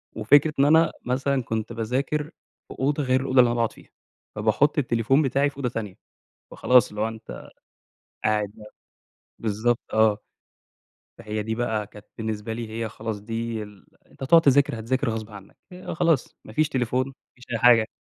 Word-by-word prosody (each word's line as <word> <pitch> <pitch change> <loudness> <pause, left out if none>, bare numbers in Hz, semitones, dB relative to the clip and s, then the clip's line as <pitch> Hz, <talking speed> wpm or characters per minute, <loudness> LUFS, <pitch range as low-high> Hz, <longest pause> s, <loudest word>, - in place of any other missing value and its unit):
وفكرة 145 +1 +4
إن 140 - +5
أنا 160 +2 +5
مثلًا 130 +1 0
كنت 110 +1 -3
باذاكر 130 +7 -1 0.4
في - - -10
أوضة 145 +2 0
غير 130 0 +2
الأوضة 130 -1 +2
اللي 125 - +7
أنا 120 - 0
باقعد 115 -1 0
فيها، - - -18 0.5
فباحط 110 +9 +2
التليفون 125 +1 +2
بتاعي 140 +1 +1
في 140 - -18
أوضة 130 -3 -1
تانية، 105 -5 -5 0.6
فخلاص 125 -2 +4
اللي 105 - -7
هو 110 - +1
أنت 110 - -10 0.7
قاعد 105 -1 +1
بقى 105 -1 -14 0.7
بالضبط 115 +2 0
آه، 110 -1 +4 1.0
فهي 110 -1 -4
دي 110 +1 -3
بقى 110 -3 -2
كانت 105 +1 -15
بالنسبة 110 0 -4
لي 115 -1 -5
هي 115 0 -3
خلاص 110 -1 -6
دي 115 0 -4
ال 105 -2 -13 0.2
أنت - - -16
هتقعد 165 +5 +6
تذاكر 140 -5 +3
هتذاكر 130 +3 -1
غصب 110 -1 -5
عنّك 100 -2 -13 0.2
آآ، 180 +1 -7
خلاص 165 -5 +1
ما 110 - -11
فيش 155 +4 +2
تليفون 130 +1 0
ما 135 - -9 0.2
فيش 125 - -15
أي 115 - 0
حاجة. 115 -1 +6
115 Hz, 175 wpm, -24 LUFS, 110-135 Hz, 1.0 s, اللي